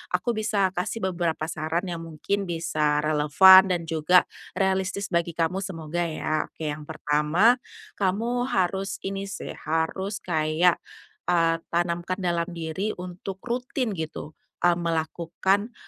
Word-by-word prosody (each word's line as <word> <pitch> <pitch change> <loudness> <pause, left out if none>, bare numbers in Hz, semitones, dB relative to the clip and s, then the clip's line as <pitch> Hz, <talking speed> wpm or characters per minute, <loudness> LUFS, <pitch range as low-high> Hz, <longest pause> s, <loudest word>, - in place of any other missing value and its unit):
aku 185 +7 0
bisa 215 -4 +1
kasih 190 +5 -3
beberapa 165 -2 -2
saran 160 +2 -2
yang 175 -3 -4
mungkin 165 +5 -3
bisa 150 -3 0
relevan 155 +6 +7
dan 175 -2 0
juga 165 +2 +3 0.3
realistis 190 0 0
bagi 170 -1 0
kamu, 170 +3 0
semoga, 175 -4 -5
ya. 155 -1 -2
Oke 155 -2 -6
yang 150 0 -5
pertama, 160 +9 +2 0.4
kamu 230 +6 0
harus 195 -4 -1
ini, 195 0 -4
sih, 200 0 -6 0.2
harus 175 +6 -1
kayak, 160 +1 +2 0.5
eee, 165 -2 +3 0.2
tanamkan 175 +2 -1
dalam 170 -2 0
diri 170 +5 -3
untuk 180 +2 -7
rutin 245 - -2
gitu, 155 -1 -6 0.2
eee, 175 -1 +4
melakukan, 170 +6 -1
175 Hz, 130 wpm, -25 LUFS, 160-195 Hz, 0.5 s, relevan